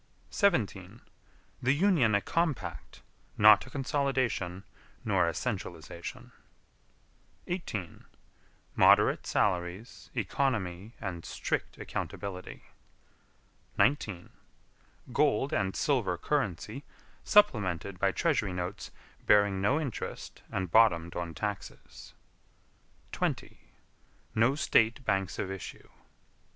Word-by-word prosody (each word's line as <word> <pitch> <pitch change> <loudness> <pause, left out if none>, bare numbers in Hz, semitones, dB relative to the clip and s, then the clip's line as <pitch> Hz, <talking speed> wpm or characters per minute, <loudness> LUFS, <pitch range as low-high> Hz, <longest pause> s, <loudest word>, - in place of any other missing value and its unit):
17. 110 - 0 0.6
The 130 +2 +3
Union 150 - +3
a 100 - +2
compact 165 -1 -2 0.3
not 105 +2 +7
a - - -10
consolidation 130 - -1 0.4
nor 85 - +2
a 85 - 0
centralization. 85 -7 -5 1.1
18. 110 - -5 0.7
Moderate - - +5
salaries, 90 +5 -1
economy 105 -3 -1
and 90 -6 -5
strict - - -3
accountability. 95 -2 -6 1.1
19. 105 -10 +1 0.8
Gold 145 0 +2
and 95 -1 0
silver 120 - +1
currency 120 - -2 0.4
supplemented 100 - +2
by 100 0 +3
treasury 140 - 0
notes 90 +3 -4 0.4
bearing 100 -2 +4
no 130 +10 +2
interest 140 -8 -6
and 95 -3 -3
bottomed 90 -7 +4
on 85 -2 -4
taxes. - - -6 1.0
20. - - -3 0.7
No 115 +5 +3
State 120 -3 +2
banks 95 -2 0
of 95 - -3
issue. 95 -2 -8
105 Hz, 90 wpm, -30 LUFS, 95-135 Hz, 1.1 s, not